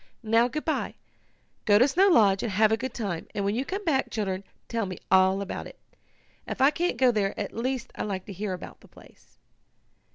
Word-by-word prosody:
"Now, 225 +2 +3
good 305 +5 -5
bye. 315 - -1 0.7
Go 205 -2 +6
to 250 +5 +5
Snow 365 +8 +4
Lodge, 205 - +5
and 230 - -2
have 215 +2 +4
a - - +4
good 255 +2 -5
time, 195 -8 -4
and 200 -1 -1
when 200 - +1
you 245 +4 -1
come 390 +8 -5
back, 275 -5 +1
children, 195 -3 -3 0.2
tell 230 -3 -2
me 185 - -6
all 190 +1 +4
about 195 - -6
it. - - -14 0.7
If - - -5
I 270 +2 +5
can't 350 +3 -1
go 255 -2 +5
there 205 -3 -1
at 205 - -4
least 255 +2 -3
I - - -6
like 190 -3 -3
to 200 - -8
hear 195 +1 -3
about 180 - -9
the - - -17
place." - - -20
220 Hz, 220 wpm, -27 LUFS, 195-260 Hz, 0.7 s, Go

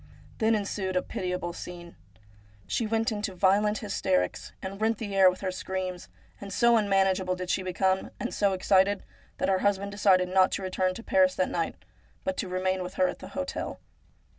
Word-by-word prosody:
Then 225 -1 +3
ensued 200 -2 -2
a 180 - +2
pitiable 180 -2 -3
scene. 175 -1 -9 0.7
She 230 - -1
went 225 +1 +1
into 210 -2 -3
violent 205 +3 +3
hysterics, 90 - -1
and 195 +2 -7
rent 220 0 +2
the 205 -3 -5
air 190 -1 +7
with 180 - -5
her 190 -2 -1
screams, 185 -1 -4 0.3
and 200 -1 -7
so 235 +4 +4
un 210 -3 +2
manageable 190 -1 +2
did 180 0 -3
she - - +1
become, 190 +1 0
and - - -3
so 200 -2 +2
excited, 190 +1 +3 0.3
that - - 0
her 190 -1 +3
husband 200 0 0
decided 190 -3 +3
not 185 0 +4
to 195 - -2
return 185 0 0
to 230 - -8
Paris 280 +1 +3
that - - 0
night, - - -1 0.5
but 280 0 -1
to 200 - -2
remain 185 +1 0
with 180 0 -6
her 185 - +3
at - - -5
the - - -9
hotel. 275 0 -4
190 Hz, 190 wpm, -28 LUFS, 185-205 Hz, 0.7 s, air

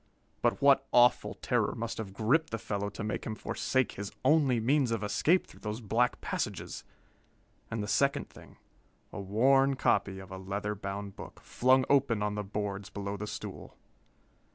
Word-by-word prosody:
But - - +1
what 135 -1 +5
awful 120 0 +4
terror - - 0
must 115 0 -4
have 105 -3 -5
gripped 120 +11 +1
the 115 - -3
fellow 100 -2 -3
to 105 - -7
make 105 -1 -3
him 110 - -4
forsake 130 +3 -1
his 100 0 -6
only 135 -4 +4
means 130 +3 +2
of 115 -2 -1
escape 150 - +2
through - - -17
those 105 +1 -4
black 120 +2 +1
passages? - - -4 0.9
And 110 -2 -3
the - - -4
second 140 +7 +1
thing - - -16 0.6
a - - -5
worn 135 +8 +3
copy 100 -6 +1
of 95 -1 -10
a 95 - -6
leather 100 +2 -3
bound 100 0 -6
book, - - -10
flung 130 +1 +3
open 130 -7 +2
on 105 0 -1
the 105 0 -3
boards 100 -1 -4
below 100 0 -4
the 105 +1 -5
stool! - - -8
110 Hz, 175 wpm, -30 LUFS, 100-130 Hz, 0.9 s, what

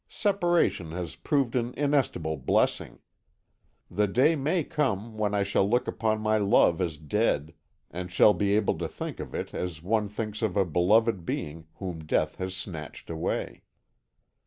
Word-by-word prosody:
Separation 175 - +1
has 85 -3 -5
proved 140 -6 0
an 120 0 -1
inestimable 135 - +1
blessing. 65 - 0 0.9
The 105 0 +1
day 130 +10 +3
may 155 +4 0
come 115 - -2
when 105 -1 0
I 100 - +2
shall 100 0 +1
look 120 +3 +1
upon 110 -1 0
my 110 0 +2
love 100 -4 +4
as 85 -4 -2
dead, 80 -1 0 0.4
and 90 +1 -6
shall 105 +3 +6
be 100 -1 +1
able 105 -1 +1
to - - -2
think - - -6
of - - -6
it - - -4
as 85 -3 -4
one 105 +2 +1
thinks 105 +1 -5
of 105 -4 0
a 100 - +4
beloved 95 +4 +2
being 80 0 -4
whom 90 -4 -6
death 75 - 0
has 95 0 -4
snatched 85 -4 -7
away. 80 -1 -3
105 Hz, 160 wpm, -27 LUFS, 90-115 Hz, 0.9 s, shall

